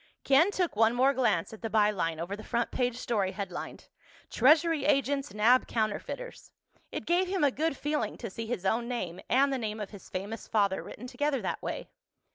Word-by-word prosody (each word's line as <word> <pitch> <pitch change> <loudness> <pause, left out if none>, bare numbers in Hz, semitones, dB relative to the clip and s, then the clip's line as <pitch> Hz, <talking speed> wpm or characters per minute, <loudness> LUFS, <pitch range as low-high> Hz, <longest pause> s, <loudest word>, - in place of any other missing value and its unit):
Ken 280 +7 +5
took 365 - -1
one 225 +2 +4
more 265 +3 +4
glance 220 -9 +1
at 220 - -11
the 225 - -3
by 210 -1 +4
line 165 -5 -2
over 175 +4 -3
the 215 - -10
front 235 -1 -1
page 245 -1 0
story 205 -6 -1
headlined: 185 -3 -6 0.4
TREASURY 310 +3 +4
AGENTS 275 -3 +1
NAB 225 +5 +4
COUNTERFEITERS. 230 - -3 0.4
It - - -5
gave 355 +2 +2
him 375 -3 0
a 285 - +4
good 310 +2 -1
feeling 300 +1 -2
to 230 -5 -6
see 225 +3 -6
his 225 -5 -3
own 230 +5 +1
name 185 -8 -4
and 275 +3 +3
the 265 - -1
name 215 -1 -3
of 210 - -5
his 200 -3 -12
famous 205 +4 -5
father 200 -3 +1
written 240 - -9
together 270 +2 -1
that - - -2
way. - - -5
235 Hz, 200 wpm, -29 LUFS, 210-275 Hz, 0.4 s, Ken